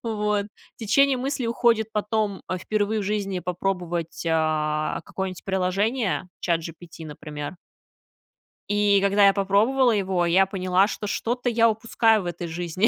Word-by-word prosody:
Вот. 210 -2 -1 0.3
Течение 260 +4 +3
мысли 270 0 -2
уходит 230 -2 +1
потом 210 -1 -1 0.2
впервые 215 +2 -1
в - - -3
жизни 195 -2 -2
попробовать, 175 -2 -3
а, 155 -1 0
какое-нибудь 190 -1 -5
приложение, 195 - 0 0.2
ChatGPT, 165 0 -3
например. 150 +2 -7 1.1
И 205 -1 +3
когда 200 0 +4
я 195 - +5
попробовала 220 +6 +3
его, 190 -4 0
я 185 +3 +4
поняла, 185 0 +2
что 210 - -5
что-то 245 +4 -1
я 230 0 +4
упускаю 225 -1 +2
в - - -9
этой 175 0 -4
жизни, 175 +5 0
200 Hz, 130 wpm, -24 LUFS, 175-220 Hz, 1.1 s, я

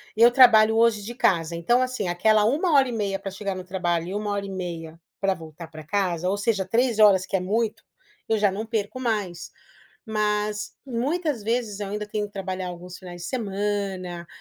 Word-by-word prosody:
eu 235 +2 +7
trabalho 225 -4 +7
hoje 230 -2 +4
de 235 - -6
casa, 175 -9 +1
então 240 +10 +2
assim, 255 -6 -2
aquela 210 +5 +3
1 310 - +1
hora 270 -2 +5
e 245 - -4
meia 200 -3 -1
para 195 - -5
chegar 195 0 -4
no 185 0 -7
trabalho 175 -2 -1
e 185 - -5
1 210 0 -2
hora 200 0 -2
e - - -7
meia 170 -4 -6 0.2
para 195 0 +2
voltar 165 -1 -10
para 155 -1 -11
casa, 180 0 -1
ou 200 - 0
seja 205 -1 0
3 235 +3 +1
horas 195 -3 +6
que - - -3
é 190 - +1
muito, 215 +4 -1 0.5
eu 220 - +3
já 205 -1 +3
não 215 +4 -4
perco 220 +2 -3
mais. 205 -9 -2 0.5
Mas 210 -1 -1
muitas 275 +2 -1
vezes 225 -2 -1
eu 205 - -3
ainda 210 +1 -3
tenho 210 0 -3
que 205 - -22
trabalhar 190 -1 -4
alguns 180 +1 -8
finais 175 -2 -10
de - - -5
semana 195 -6 -3
205 Hz, 205 wpm, -25 LUFS, 185-225 Hz, 0.5 s, eu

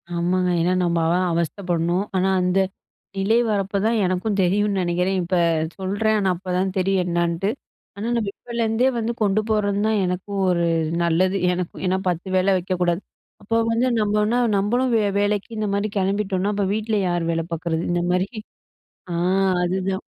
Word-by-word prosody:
ஆமாங்க. 180 +1 +1
ஏன்னா 180 +2 +2
நம்ம 170 -1 +1 0.2
அ - - +2 0.2
அவஸ்தைப்படணும். 175 +1 -1
ஆனா, 185 - +2
அந்த 180 +1 +2 0.6
நிலை 195 +4 +2
வரப்ப 200 -1 -1
தான் 230 0 +2
எனக்கும் 185 +3 -1
தெரியுன்னு 200 +2 +1
நினைக்கிறேன். 180 +2 0
இப்ப 180 +2 -1 0.4
சொல்றேன். 205 +3 0
ஆனா, 195 -2 +1
அப்பதான் 185 +1 -2
தெரியும் 190 0 +2
என்னான்னுட்டு. 170 +2 0 0.4
ஆனா, 200 - -6
நம்ம 215 -4 -1
இப்பலேருந்தே 235 +1 0
வந்து 230 +1 -1
கொண்டு 205 0 +2
போறது 205 -2 +1
தான் 220 -1 +2
எனக்கும் 185 +2 -3
ஒரு 170 -1 +1 0.4
நல்லது. 180 +3 +2 0.2
எனக்கு 180 -1 -4
ஏன்னா 185 +1 +1
10 175 +1 -2
வேல 190 +1 +3
வைக்கக்கூடாது. 180 -1 -1 0.4
அப்போ 225 +3 -1 0.2
வந்து 235 +3 +2
நம்மன்னா 210 +2 +1 0.2
நம்மளும் 245 +6 +1 0.3
வேலைக்கு 205 +1 0
இந்தமாரி 205 -1 -1
கிளம்பிட்டோன்னா, 195 0 0
அப்போ 200 -1 0
வீட்ல 220 0 -1
யாரு 175 -1 0
வேல 165 0 -1
பார்க்குறது? 165 0 -2
இந்தமாரி, 180 +2 +1 0.9
அ - - -2 0.5
அதுதான். 190 +1 -1
190 Hz, 145 wpm, -22 LUFS, 180-205 Hz, 0.9 s, வேல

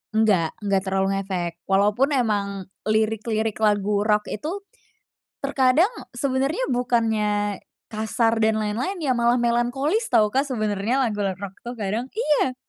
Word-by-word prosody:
Enggak 200 -7 +3
enggak 195 -1 +1
terlalu 195 0 +1
ngefek. 175 -3 -3
Walaupun 210 +9 +2
emang 200 -5 0 0.2
lirik-lirik 220 0 0
lagu 205 -1 +2
rock 210 -1 +3
itu, 335 - -4 0.8
terkadang 275 - +3 0.2
sebenernya 275 - 0
bukannya 220 -4 0 0.3
kasar 225 +1 0
dan 220 0 +3
lain-lain 240 - -2
ya 280 -5 0
malah 235 0 +3
melankolis 245 - +1
tau 215 -1 +5
Kak 270 +2 +1
sebenernya 220 +1 0
lagu 215 -3 -2
rock-rock 195 0 -4
tuh 245 - -5
kadang 220 +3 -2
iya. 300 - +1
220 Hz, 130 wpm, -23 LUFS, 205-255 Hz, 0.8 s, tau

